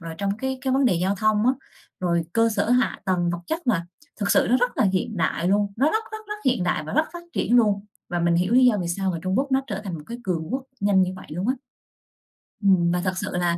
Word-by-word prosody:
rồi 165 -1 -7
trong 200 0 -1
cái 265 +1 -2
cái 265 -1 -1
vấn 270 +1 +3
đề 220 -8 +4
giao 185 +4 +1
thông 215 +2 +2
á, 255 - +5 0.5
rồi 170 -2 +1
cơ 230 0 +3
sở 220 - 0
hạ 250 +1 +2
tầng, 180 -3 +1
vật 175 - -3
chất 330 -2 -3
mà 170 -9 +1 0.3
thực 200 -1 0
sự - - +4
nó 250 - +5
rất 245 0 0
là - - +3
hiện 220 +3 -1
đại 170 0 0
luôn, 200 +1 +2
nó 270 +5 +3
rất 445 +1 0
rất 435 -1 -7
rất 420 - -3
hiện 250 -8 +2
đại 165 -3 0
và 155 - -6
rất 310 +2 +3
phát 345 0 -8
triển 245 - +2
luôn. 205 -4 +3 0.2
Và 175 - -2
mình 170 0 +2
hiểu 180 +5 +1
lý 255 +1 +6
do 245 -4 +5
vì 175 - -3
sao 190 +2 -1
mà 170 - -3
Trung 185 +2 0
Quốc 275 0 -1
nó 265 - +4
trở 205 -5 -4
thành 185 -4 -4
một 150 - -7
cái 235 +1 -7
cường 165 -4 -2
quốc 265 +1 -2 0.2
nhanh 200 -1 +4
như 185 0 -1
vậy - - -11
luôn 180 +8 -3
á. 260 - +2 1.1
Ừm, 185 -4 +4
và 180 0 0
thật 185 -1 0
sự 205 +2 -3
là 175 -1 +1
200 Hz, 280 wpm, -24 LUFS, 180-245 Hz, 1.1 s, lý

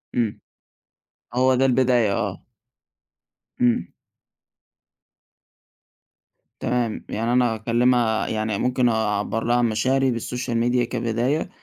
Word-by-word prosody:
إمم، 115 -4 -1 0.9
هو 130 +1 +3
ده 130 +1 +2
البداية 125 -4 +3
آه. - - -3 1.2
إمم. 120 -1 +1 2.7
تمام، 120 -3 -2
يعني 115 +2 -1
أنا 125 -2 +2
أكَلمها 115 0 +1
يعني 110 -1 -2
ممكن 125 +1 +1
أعَبّر 110 0 -1
لها 120 +1 +1
عن 120 0 +3
مشاعري 130 +5 +1
بالsocial 125 +1 -4
media 120 0 +2
كبداية 120 +7 -1
120 Hz, 100 wpm, -23 LUFS, 110-125 Hz, 2.7 s, هو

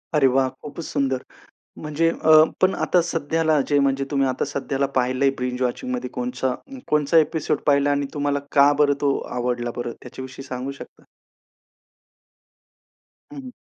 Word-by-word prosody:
अरे 140 -3 +5
वाह! 135 0 +3 0.2
खूपच 150 +3 -7
सुंदर. 135 -2 -1 0.6
म्हणजे 155 +2 +1
अ, 160 -1 +3 0.3
पण 185 +1 +4
आता 180 - +2
सध्याला 160 -2 0
जे 145 - +2
म्हणजे 135 0 +1
तुम्ही 135 -1 +2
आता 130 +2 -1
सध्याला 140 -1 -2
पाहिलंय 130 +2 +2
बिंज 125 0 -3
वॉचिंगमध्ये 250 - -2
कोणचा 245 - -2 0.3
कोणचा 150 +2 +2
एपिसोड्स 160 0 +1
पहिला 140 0 +4
आणि 140 0 0
तुम्हाला 145 -1 0
का 140 +1 +6
बरं 145 -1 +4
तो 140 -1 +2 0.2
आवडला 120 -1 -1
बरं 120 0 -4
त्याच्याविषयी 130 +2 -9
सांगू 130 +1 -5
शकता? 140 - -13 2.3
हं, - - -10
हं. 255 -1 -10
140 Hz, 145 wpm, -23 LUFS, 130-155 Hz, 2.3 s, का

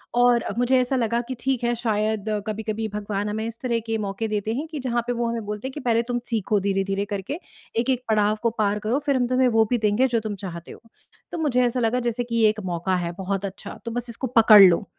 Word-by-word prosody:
और 245 -1 +4
मुझे 250 +2 +3
ऐसा 255 +1 +1
लगा 235 -2 +1
कि 260 - -4
ठीक 260 0 -1
है, 240 0 +2
शायद 215 -2 -1 0.2
कभी-कभी 220 +1 -3
भगवान 205 0 -2
हमें 220 +1 -3
इस 230 0 -6
तरह 235 -2 0
के 225 0 0
मौके 205 +1 -3
देते 215 0 -2
हैं 290 +7 -3
कि 310 -2 -6
जहाँ 240 -2 0
पे 245 - 0
वो 235 0 -1
हमें 230 -2 -3
बोलते 210 +4 -4
हैं, 265 - -7
कि 300 - -6
पहले 235 -3 +1
तुम 245 0 -2
सीखो 215 -3 +1
धीरे-धीरे 195 0 -1
करके, 205 - -4 0.4
एक-एक 250 +2 0
पड़ाव 210 -1 +3
को 230 - +3
पार 210 0 +1
करो, 220 +6 0
फिर 280 -2 +2
हम 250 -1 +1
तुम्हें 255 +1 +3
वो 225 -2 +4
भी 245 - +3
देंगे 215 +4 +2
जो 235 -2 +1
तुम 215 -2 -4
चाहते 175 -4 -8
हो। - - -12 0.5
तो - - -4
मुझे 260 -6 +2
ऐसा 245 +1 0
लगा 235 +1 +1
जैसे 240 0 -1
कि 235 -1 -5
ये 225 -2 +5
एक 215 0 -2
मौका 180 +1 -1
है 175 -1 -2
बहुत 195 +1 -2
अच्छा, 195 -1 -8
तो 230 - -3
बस 245 +1 -3
इसको 235 +3 -3
पकड़ 220 -2 +9
लो। 180 +1 +5
225 Hz, 250 wpm, -24 LUFS, 210-245 Hz, 0.5 s, पकड़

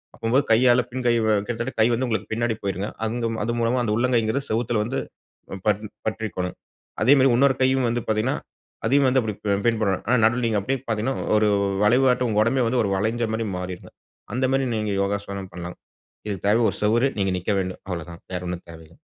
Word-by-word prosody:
அப்போது 120 +4 +1
கையால 120 +2 +5
பின் 130 +1 -4
கை 120 - +4
கிட்டத்தட்ட 110 +1 0
கை 110 - +6
வந்து 125 +3 0
உங்களுக்கு 110 -2 -2
பின்னாடி 115 +1 0
போய்டுங்க. 100 +1 -2 0.2
அந்த 115 +1 -1 0.2
அது 120 +2 -1
மூலமா 120 +2 +1
அந்த 110 - -1
உள்ளங்கைங்கிறது 120 +2 +1
சுவத்துல 115 0 0
வந்து, 120 +5 -2 0.5
அ, - - -3
ப - - +3 0.4
பற்றி 110 0 -3
கொள்ளணும். 90 -1 -3 0.4
அதே 135 - +6
மாரி 135 0 +5
இன்னொரு 135 +1 +4
கையும் 130 -1 +3
வந்து 120 0 -1
பாத்தீங்கன்னா, 110 +6 +1 0.5
அதையும் 140 +3 +4
வந்து, 130 +1 +3
அப்டி 110 -2 -3 0.3
பின் 115 -1 +2
பண்ணனும். 100 -4 0
ஆனா, 125 - +4
நடுவுல 120 +2 +2
நீங்க 110 -3 +1
அப்டியே 135 +3 -1
பாத்தீங்கன்னா, 115 +4 -1 0.2
ஒரு 105 0 +3 0.4
வளைவாட்டம் 125 +2 +3
உங்க 105 0 +3
உடம்பே 125 +1 +1
வந்து 125 +1 +1
ஒரு 100 - -1
வளைஞ்ச 110 +4 0
மாரி 110 0 -2
மாறிருங்க. 90 0 -6 0.4
அந்த 130 +2 0
மாரி 135 0 +1
நீங்க 105 -1 -1
யோகாசனம் 100 -1 -3
பண்லாம். 90 0 -7 0.5
இதுக்கு 100 -2 -4
தேவ 115 +3 +4
ஒரு - - -9
சுவறு, 115 +5 +3
நீங்க 95 -1 +1
நிக்க 90 - -4
வேண்டும். 95 0 -5
அவ்ளோ 85 -3 -4
தான் 85 0 -11
வேற 90 0 -3
ஒண்ணும் 90 0 -5
தேவயில்ல. 80 0 -14
115 Hz, 200 wpm, -23 LUFS, 100-125 Hz, 0.5 s, கை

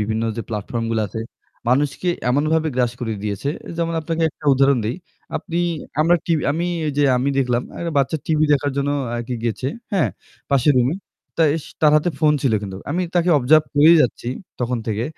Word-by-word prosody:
বিভিন্ন 110 +1 -1
যে 115 - -3
platform 115 +2 -3
গুলা 110 -1 +1
আছে 110 +4 -5 0.5
মানুষকে 140 +7 +1 0.2
এমনভাবে 155 +4 +1
গ্রাস 120 -2 +1
করে 115 -2 -2
দিয়েছে। 105 +6 -3 0.3
যেমন 165 0 -1
আপনাকে 165 +1 -2
একটা - - -19
উদাহরণ 135 -1 +4
দেই। 115 - -2 0.4
আপনি 170 - -4 0.4
আমরা 170 +3 +4
টি 170 - +1 0.2
আমি 170 +3 -1 0.2
ঐযে 145 0 0 0.4
দেখলাম 125 -2 +1 0.2
একটা 170 -1 -3
বাচ্চা 140 +3 +1
টিভি 155 -1 +2
দেখার 145 0 +1
জন্য 140 0 0 0.2
অ্যা 120 - -2
কি 125 - -2
গিয়েছে, 120 +3 -1 0.2
হ্যাঁ? 190 -5 +2 0.4
পাশের 140 +1 +4
রুমে। 125 +6 +2 0.4
তা 165 - +3
এস 155 - -6 0.2
তার 150 -1 +5
হাতে 155 +3 +1
phone 150 -1 +3
ছিল 130 - +2
কিন্তু। 95 -2 -6
আমি 175 +5 0
তাকে 175 0 +2
observe 150 +4 +4
করেই 155 +4 +7
যাচ্ছি 120 -1 -2 0.3
তখন 125 0 -1
থেকে। 110 0 -1
140 Hz, 180 wpm, -21 LUFS, 120-155 Hz, 0.5 s, করেই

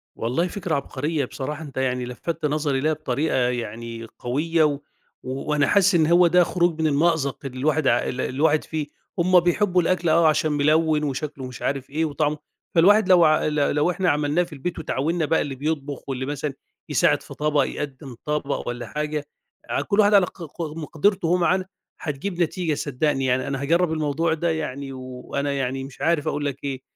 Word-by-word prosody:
والله 130 +10 0
فكرة 180 -4 -2
عبقرية 145 +2 -2
بصراحة 145 +4 -5
أنت 140 -4 -11
يعني 125 -1 0
لفتّ 150 +6 -4
نظري 145 -2 0
لها 155 +3 +1
بطريقة 155 0 -1
يعني 115 -2 -2
قوية 155 +6 +1
و 145 -2 +2 0.5
وأنا 140 +2 0
حاسس 200 +1 +4
إن 160 -2 +4
هو 175 +1 +6
ده 180 +1 +5
خروج 170 -2 0
من 160 - +3
المأزق 145 -2 +1
اللي 130 -1 -6
الواحد 155 0 +1
ع 120 - +5
ال 130 - -3
الواحد 150 +3 +1
فيه، 155 -2 -4 0.3
هم 180 +1 +5
بيحبوا 180 +1 +2
الأكل 175 -1 +1
آه 165 +1 +5
عشان 155 0 +2
ملوّن 155 +1 +2
وشكله 140 -1 -3
مش 125 -1 -9
عارف 135 -1 -2
إيه 155 +3 0
وطعمه 150 0 0 0.4
فالواحد 195 +4 +5
لو 175 -2 +7 0.2
لو 150 -1 +1
لو 150 +4 +2
إحنا 180 0 0
عملناه 150 +3 +2
في 175 -2 -10
البيت 165 +5 -4
وتعاونّا 160 +2 -1
بقى 160 +2 +2
اللي 140 -2 -4
بيطبخ 145 -1 -4
واللي 130 0 -2
مثلًا 145 0 -3 0.4
يساعد - - +3
في - - -11
طبق 150 -1 +1
يقدم 135 -3 -6
طبق 150 -1 -2
والَّا 120 0 -4
حاجة 150 0 -3 0.4
ع - - 0
كل 205 0 0
واحد 205 0 +5
على 195 -3 +6
ق 175 - -10
ق 165 +2 -9 0.2
مقدرته 165 +4 0
وهو 180 +2 +3
معانا 180 +2 +2 0.3
هتجيب 175 +3 -3
نتيجة 170 -1 0
صدقني، 145 -1 -1
يعني 130 +2 +1
أنا 140 -1 -3
هاجرب 170 +4 +2
الموضوع 160 +1 0
ده 170 +1 -1
يعني، 140 -3 -4
وأنا 130 +2 -4
يعني 135 -1 -2
مش 135 0 -11
عارف 160 -2 +1
أقول 145 -1 -1
لك 140 -1 -4
إيه 135 -2 -3
150 Hz, 185 wpm, -23 LUFS, 135-165 Hz, 0.5 s, لو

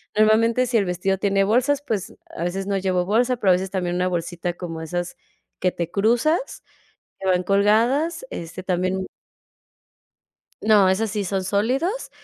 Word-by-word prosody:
normalmente 225 +3 +4
si 240 - +2
el 200 - +2
vestido 180 +2 -1
tiene 195 0 +1
bolsas, 255 +7 +2
pues, 220 0 -3
a 170 - -6
veces 190 +2 -3
no 200 - 0
llevo 185 -2 0
bolsa, 240 +5 +2
pero 195 -4 +3
a - - +7
veces 185 +1 -2
también 180 -2 -2
una 180 0 +1
bolsita 175 0 -3
como 165 -2 -7
esas 175 +2 -4 0.4
que 180 - +1
te 170 -2 -4
cruzas, 240 - +1 0.6
que 190 - -5
van 180 -1 +3
colgadas, 230 - +2
este 170 +2 -7
también 185 +1 -1 1.6
No, 210 -3 +5
esas 215 +3 0
sí 205 -1 -2
son 190 0 -1
sólidos, 260 - -1
195 Hz, 160 wpm, -22 LUFS, 180-225 Hz, 1.6 s, a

